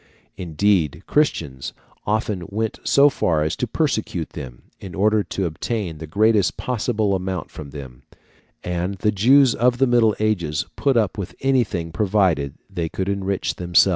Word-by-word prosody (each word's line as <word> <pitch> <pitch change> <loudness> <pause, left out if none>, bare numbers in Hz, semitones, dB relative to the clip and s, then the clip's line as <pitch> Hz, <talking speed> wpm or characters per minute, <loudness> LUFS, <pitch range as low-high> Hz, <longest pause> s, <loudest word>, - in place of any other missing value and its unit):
Indeed, 90 -2 0
Christians 75 - 0 0.3
often 105 -2 0
went 110 +2 -2
so 140 +1 +5
far 85 - +1
as 80 - -1
to - - -1
persecute - - -1
them, 60 -2 -9 0.2
in 95 -4 -9
order 105 +2 +3
to 95 +2 -2
obtain 85 0 -3
the 80 - -7
greatest 105 +2 +2
possible 110 -4 0
amount 95 -2 -3
from 75 -2 -9
them; 65 -3 -10 0.6
and 90 +2 -2
the 105 +3 +1
Jews 125 +5 +5
of 120 +1 +2
the 135 - +4
Middle 120 -4 +3
Ages 85 -9 0
put 135 -3 +1
up 105 -2 0
with 95 - -5
anything 115 -11 0
provided 90 -7 +1
they 85 -4 -3
could 95 +3 -3
enrich 100 -1 -2
themselves. 90 +2 +4
95 Hz, 155 wpm, -22 LUFS, 85-110 Hz, 0.6 s, so